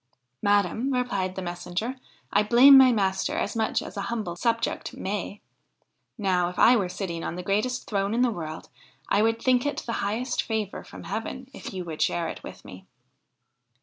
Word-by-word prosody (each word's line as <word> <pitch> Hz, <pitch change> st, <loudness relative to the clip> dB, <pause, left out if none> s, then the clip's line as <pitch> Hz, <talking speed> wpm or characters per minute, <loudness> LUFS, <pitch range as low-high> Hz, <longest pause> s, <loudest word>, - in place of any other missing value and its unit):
' 125 Hz, 0 st, -52 dB
Madam,' 205 Hz, +6 st, +2 dB
replied 200 Hz, -8 st, -1 dB
the 190 Hz, -, -4 dB
messenger, 180 Hz, +8 st, -4 dB, 0.2 s
' -, -, -25 dB
I -, -, +5 dB
blame 245 Hz, +6 st, +8 dB
my 265 Hz, -1 st, +8 dB
master 190 Hz, -4 st, 0 dB
as 205 Hz, -, -2 dB
much 220 Hz, -1 st, 0 dB
as -, -, -9 dB
a 200 Hz, -, -3 dB
humble 215 Hz, -7 st, -3 dB
subject 230 Hz, +4 st, -1 dB
may. 200 Hz, +1 st, -4 dB, 0.8 s
Now 185 Hz, -4 st, +1 dB
if 180 Hz, -, -10 dB
I 245 Hz, -, +7 dB
were 195 Hz, -6 st, 0 dB
sitting 170 Hz, -3 st, -4 dB
on -, -, -4 dB
the 180 Hz, -, -5 dB
greatest 210 Hz, +7 st, -1 dB
throne 200 Hz, +1 st, 0 dB
in 245 Hz, -, +3 dB
the 245 Hz, -, +2 dB
world, 160 Hz, -5 st, -7 dB, 0.4 s
I 205 Hz, -, +3 dB
would 225 Hz, +1 st, +2 dB
think 250 Hz, -1 st, +3 dB
it 290 Hz, -, -2 dB
the 230 Hz, -, -3 dB
highest 230 Hz, +5 st, -1 dB
favour 220 Hz, -3 st, -3 dB
from -, -, -11 dB
heaven 235 Hz, +5 st, -5 dB
if -, -, -8 dB
you 185 Hz, -2 st, -5 dB
would 160 Hz, -2 st, -6 dB
share 170 Hz, -1 st, +1 dB
it -, -, -7 dB
with -, -, -11 dB
me.' 95 Hz, 0 st, -12 dB
205 Hz, 195 wpm, -26 LUFS, 180-235 Hz, 0.8 s, blame